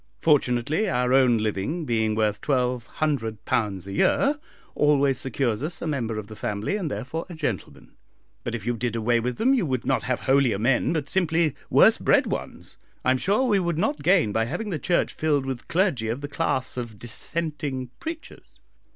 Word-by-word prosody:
Fortunately 145 - +2
our 125 -2 +1
own 130 -3 +5
living, 110 - -2
being 110 -4 +1
worth 105 -1 0
£1200 120 - -1
a 100 - -7
year, 280 - +2 0.3
always 140 -2 +3
secures 120 -3 -1
us 155 +4 -3
a - - -5
member 120 -8 -2
of 110 - -4
the 110 +1 -11
family, 105 - -2
and 190 -7 -2
therefore 130 +9 -4
a 175 - -7
gentleman; 135 - -5 0.5
but 120 - -3
if 110 -3 -6
you 120 0 0
did 115 0 -2
away 115 +1 +2
with 120 +1 -3
them 260 +4 +3
you 250 -6 +2
would 130 -6 -2
not - - +1
have 125 -1 -2
holier 135 -5 +3
men, 120 +4 +2
but 155 -4 -1
simply 165 -3 +1 0.2
worse - - +6
bred - - +3
ones. - - -6 0.3
I 130 - +4
am 130 - +1
sure 205 - +2
we 215 -6 +3
should 170 -3 -1
not 155 -5 0
gain 170 - +3
by 115 +2 +1
having 185 - -4
the 160 - -2
Church 175 +3 +1
filled 145 -3 0
with 130 -2 -5
clergy 165 - +1
of 120 +5 -3
the 145 - -4
class 145 -4 -1
of 115 -4 -5
Dissenting 135 +1 -3
preachers." 325 0 -8
130 Hz, 185 wpm, -25 LUFS, 115-160 Hz, 0.5 s, worse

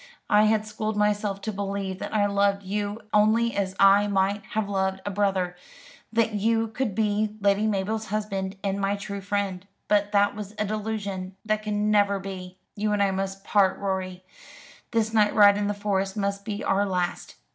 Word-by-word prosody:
I 210 +1 +6
had 215 0 +2
schooled 215 0 -3
myself 210 -1 0
to 220 - -3
believe 195 -1 -3
that - - -5
I 210 -2 +2
loved 200 0 +1
you 205 +2 -3
only 220 +3 +3
as 190 -2 -1
I 195 +1 +6
might 200 +1 +1
have 220 -2 0
loved 190 -1 -1
a 205 - -2
brother; 190 -3 0 0.6
that 225 -1 +1
you 225 +2 +1
could 220 -2 -2
be 215 0 0
Lady 200 +1 +2
Mabel's 215 +2 -1
husband 200 -2 -3
and 200 0 -1
my 195 +1 +1
true 200 0 -6
friend. 200 -1 -2 0.2
But 205 0 +2
that 205 0 +3
was 210 0 -8
a 215 - 0
delusion 205 -3 -4
that 215 0 0
can 210 0 0
never 200 -1 +3
be. 185 -1 -7 0.2
You 210 0 0
and 205 -1 +2
I 195 - +2
must 195 0 -3
part, 195 -3 +3
Rorie. 185 -2 -3 0.7
This 225 -1 0
night 210 -2 +3
ride 205 -1 +7
in 205 0 -1
the 205 - 0
Forest 195 -1 -1
must 200 0 -2
be 210 0 -4
our 195 +1 +2
last. 180 -2 -2
205 Hz, 185 wpm, -26 LUFS, 195-210 Hz, 0.7 s, ride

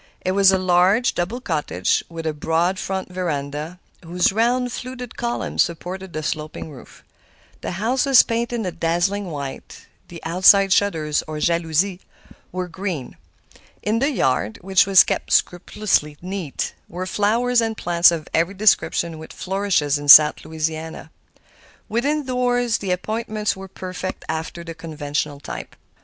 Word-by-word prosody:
It 185 - -1
was 195 0 +5
a 190 - +3
large, 185 +5 +3
double 185 +8 -2
cottage, 150 - -1
with 165 -1 -7
a 160 - -1
broad 165 +5 0
front 190 -1 -4
veranda, 155 -1 -4 0.2
whose 175 +2 +1
round, 245 +3 +1
fluted 250 -1 -7
columns 240 0 -1
supported 180 +2 -3
the 155 -1 -5
sloping 155 +1 -4
roof. 135 - -14 0.6
The - - -4
house 240 +9 0
was 270 -3 +7
painted 235 -1 -2
a 180 - -2
dazzling 175 +5 -1
white; 140 -5 -7 0.2
the 170 - -10
outside 190 +3 +5
shutters, 160 -8 +1
or 155 0 -5
jalousies, 170 +3 0 0.5
were 185 0 -3
green. 175 -6 -5 0.7
In 215 +2 +1
the 275 +3 +2
yard, 130 - 0
which 190 +1 +3
was 195 -2 +8
kept - - -3
scrupulously 175 -4 +1
neat, 185 -5 -4 0.2
were 180 +2 -5
flowers 230 +5 +1
and 225 -1 -2
plants 170 0 +4
of 165 -3 -3
every 170 +5 +1
description 170 -5 +2
which 160 - -10
flourishes 185 -7 0
in 145 - -7
South 150 +1 +8
Louisiana. 160 0 -5 0.8
Within 285 +6 -1
doors 245 -2 0
the 195 - -5
appointments 215 +3 -2
were 190 0 -9
perfect 185 0 -6
after 160 +2 -4
the 165 0 -7
conventional 150 -3 -4
type. - - -8
180 Hz, 145 wpm, -21 LUFS, 160-210 Hz, 0.8 s, was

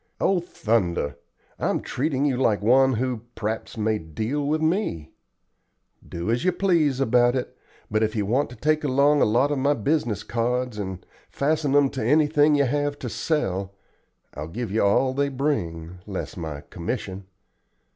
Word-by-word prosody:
"Oh 190 -2 +2
thunder! 100 - -1 0.4
I'm - - 0
treating 140 0 -1
you 140 -3 +1
like 115 -5 +2
one 130 +4 +5
who, 125 -1 -1
p'raps, 110 +1 -4
may 110 0 0
deal 110 - -3
with 155 +2 +1
me. 160 - -1 1.0
Do 85 +6 -3
as 120 +5 0
you 185 - +3
please 170 -8 +2
about 120 -1 +3
it, 125 - -3 0.4
but 110 +1 +1
if 110 0 0
you 105 -2 0
want 125 +5 +1
to 125 - -10
take 155 +3 +1
along 145 +1 +3
a - - +6
lot 120 +7 +2
of 145 - 0
my 140 +2 +2
business 120 -4 0
cards 120 -1 -1
and 95 -2 -5 0.2
fasten 145 -1 0
'em 145 -2 +4
to 130 - -4
anything 150 +3 +4
you 140 -1 +3
have 145 +2 -1
to 125 - -5
sell, 100 - -1 0.6
I'll 75 +2 -6
give 110 +6 -5
you 110 - +1
all 130 +6 +3
they 140 +1 0
bring, 90 - -2
less 100 -2 -5
my 80 -4 -5
commission." 95 - -5
125 Hz, 165 wpm, -24 LUFS, 105-145 Hz, 1.0 s, a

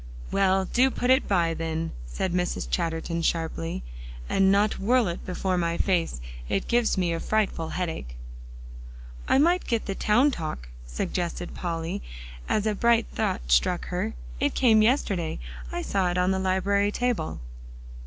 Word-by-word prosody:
"Well, 190 -1 +3
do 255 +7 +3
put 250 -1 0
it 260 +1 +4
by, 170 -4 +2
then," 165 0 -3 0.2
said 170 - -2
Mrs. 180 0 -1
Chatterton 165 -1 -1
sharply, 165 - -2 0.4
"and 190 - +3
not 205 +2 +2
whirl 235 +2 +3
it 170 - -4
before 185 0 -1
my 170 0 0
face; 175 - 0 0.3
it 195 - -1
gives 240 -3 +2
me 175 -2 +1
a 165 - -2
frightful 200 -7 0
headache." 160 - -4 1.1
"I - - +4
might 345 +6 +3
get 230 -2 0
the 195 - -2
Town 240 +9 +3
Talk" 155 - -5 0.2
suggested 175 - -3
Polly, 170 +2 -3 0.5
as 210 - +1
a 215 - +2
bright 235 +2 +3
thought - - -2
struck - - +2
her. - - -2 0.2
"It - - 0
came 225 -4 +5
yesterday. 205 - +1 0.3
I - - -3
saw 190 -3 +1
it 175 - -1
on 180 +1 +2
the 190 - 0
library 200 +2 +1
table." 240 -9 -1
185 Hz, 155 wpm, -26 LUFS, 165-215 Hz, 1.1 s, came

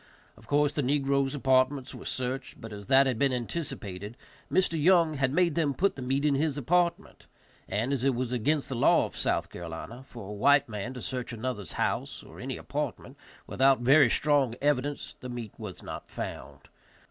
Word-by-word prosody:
Of - - -19
course 145 0 +2
the 150 - 0
negroes' 140 0 +1
apartments 130 0 +2
were - - -10
searched; 130 +1 -4
but 110 -1 -8
as 100 -1 -9
that 135 +1 +6
had 125 -4 -1
been 140 -1 +3
anticipated, 120 - -5 0.3
Mr. 170 -4 +2
Young 170 -1 +5
had 135 -3 0
made 170 +1 +2
them 145 -3 0
put 200 +2 +1
the 135 - -7
meat 135 +3 0
in 150 - +3
his 150 +1 0
apartment, 170 +4 0 0.4
and, 115 +7 0
as 130 -3 -1
it 135 -2 +2
was 125 0 -2
against 140 +5 0
the 135 - -4
law 120 - +4
of - - -9
South - - -1
Carolina 85 +8 -7
for 115 -6 -9
a - - -5
white 140 +7 +4
man 115 +3 -5
to 125 - -6
search 125 -1 -4
another's 115 -4 -4
house, - - -2
or - - -13
any - - -4
apartment, - - -4 0.3
without 135 -1 +3
very 135 +1 +6
strong 140 -3 +2
evidence, 145 0 -1
the 125 - -7
meat 120 -4 -6
was 105 -6 -7
not - - -7
found. - - -7
135 Hz, 190 wpm, -28 LUFS, 120-145 Hz, 0.4 s, that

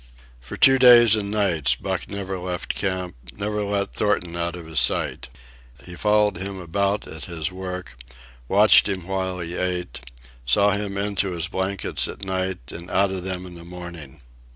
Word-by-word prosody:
For - - -9
two 135 0 +6
days 120 -3 +8
and 100 -2 -2
nights 95 -9 +1
Buck - - -4
never 95 -2 -4
left 90 -1 -4
camp, 95 -2 -2 0.2
never 105 - -3
let 100 -1 -2
Thornton 90 -5 0
out 85 0 -2
of 85 -2 -9
his 80 -1 0
sight. - - 0 0.6
He 90 - -9
followed 105 -1 +2
him 95 +1 -5
about 100 +3 -1
at 80 - -8
his 80 -1 -3
work, 90 -7 -7 0.5
watched 105 - +6
him 95 -3 -3
while 95 -1 -3
he 85 +1 -5
ate, 90 -8 -3 0.4
saw 100 +12 +3
him 100 -1 -2
into 100 -1 -1
his 85 -1 -2
blankets 95 +1 -1
at 100 - -7
night 95 -8 -3
and 85 +1 -9
out 100 0 +2
of 95 -1 -3
them 95 -1 -4
in 90 - -10
the 85 -1 -11
morning. 85 -5 -10
95 Hz, 175 wpm, -23 LUFS, 85-100 Hz, 0.6 s, days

